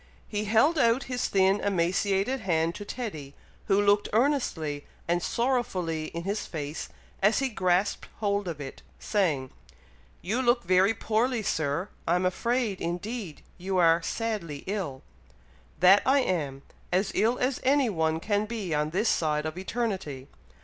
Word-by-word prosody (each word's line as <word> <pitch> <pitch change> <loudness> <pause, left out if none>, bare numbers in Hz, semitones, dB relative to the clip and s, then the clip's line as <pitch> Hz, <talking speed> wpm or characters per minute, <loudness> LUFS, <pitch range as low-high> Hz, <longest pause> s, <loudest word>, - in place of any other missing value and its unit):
He 210 0 -2
held 230 +10 +3
out 235 +1 +3
his 250 -2 -2
thin 195 +1 +3
emaciated 195 +5 +1
hand 165 -5 0
to 205 - -7
Teddy, 175 - -6 0.3
who 195 - +3
looked 205 0 +3
earnestly 210 - 0 0.2
and 175 +1 +1
sorrowfully 185 -11 -1
in 170 +2 -6
his 200 +3 -2
face 150 -1 -5 0.3
as 210 +3 +4
he 270 -1 +1
grasped 190 -2 0
hold 200 -2 0
of 165 -4 -4
it, 135 -2 -8 0.2
saying, 155 - 0 0.7
"You 220 +8 0
look 240 -1 +2
very 185 +4 +3
poorly, 225 +3 0
Sir! 160 0 -1 0.2
I'm 180 +2 +2
afraid, 230 +2 0
indeed, 180 +1 -4 0.2
you 190 +1 -2
are 165 -1 +5
sadly 185 -8 -3
ill." 185 -10 -4 0.8
"That 190 +3 +7
I 275 +1 +4
am! 145 - -2 0.3
as 190 +3 +1
ill 230 +3 +2
as 255 +1 0
any 270 -2 +3
one 160 -3 0
can 205 +3 0
be 210 -7 -3
on 150 0 +1
this 195 +8 0
side 150 -5 +1
of 155 +1 -3
eternity! 190 - -3
195 Hz, 150 wpm, -28 LUFS, 165-225 Hz, 0.8 s, That